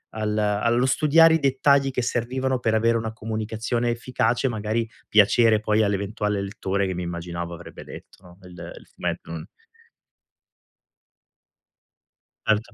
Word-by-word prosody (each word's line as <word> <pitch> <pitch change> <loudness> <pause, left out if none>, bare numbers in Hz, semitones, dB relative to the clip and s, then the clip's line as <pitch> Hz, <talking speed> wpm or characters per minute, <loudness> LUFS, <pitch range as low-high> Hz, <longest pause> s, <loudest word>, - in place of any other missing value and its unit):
al 110 -1 -2
allo 110 +4 +1
studiare 160 +4 +5
i - - +1
dettagli 135 0 +3
che 125 - -2
servivano 130 +2 -1
per 115 -2 +1
avere 115 +1 +2
una 110 -1 -4
comunicazione 110 +2 -3
efficace, 120 +1 0
magari 110 0 -2 0.2
piacere 110 +1 +5
poi 110 0 +1
all'eventuale 105 0 -1
lettore 100 0 -2
che 95 - -2
mi 90 - -4
immaginavo 85 0 -5
avrebbe 85 - -10
letto, - - -13
no, 90 0 -16
il 90 - -13 0.3
il - - -14
fumetto, - - -4
no. 80 -1 -6 3.0
Certo. 110 +2 0
110 Hz, 130 wpm, -24 LUFS, 105-120 Hz, 3.0 s, studiare